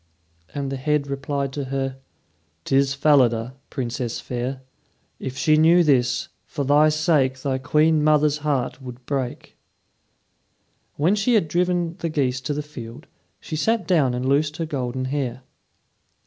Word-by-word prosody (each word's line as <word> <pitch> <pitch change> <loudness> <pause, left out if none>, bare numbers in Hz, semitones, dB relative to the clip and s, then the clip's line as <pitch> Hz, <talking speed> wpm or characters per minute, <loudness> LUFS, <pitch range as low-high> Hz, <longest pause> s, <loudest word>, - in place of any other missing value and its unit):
And 140 -1 -3
the 135 - -3
head 150 +1 0
replied 140 0 -3
to 140 -1 -3
her: 135 0 -3 0.7
"'Tis 135 0 +2
Falada, 130 -5 +3 0.2
Princess 120 -2 -3
fair. 130 +2 -4 0.6
If 130 0 -6
she 155 +2 +3
knew 165 +3 +6
this, 125 -5 +2 0.2
for 145 - -3
thy 145 +3 +5
sake 150 -4 +2
Thy 130 -1 -1
queen 150 +3 +2
mother's 150 -1 +3
heart 140 -3 -1
would 125 -1 -10
break." 130 -3 -4 1.4
When 160 +7 +2
she 215 +4 +2
had 200 -7 +2
driven 175 +1 0
the 165 - -2
geese 135 -4 0
to 145 - -2
the 150 - -3
field, 120 -6 -10 0.3
she - - -6
sat 220 +5 +1
down 145 -9 +3
and 125 +1 -3
loosed 150 +3 +1
her 165 - -2
golden 130 -3 -3
hair. 130 -2 -3
140 Hz, 150 wpm, -23 LUFS, 130-155 Hz, 1.4 s, knew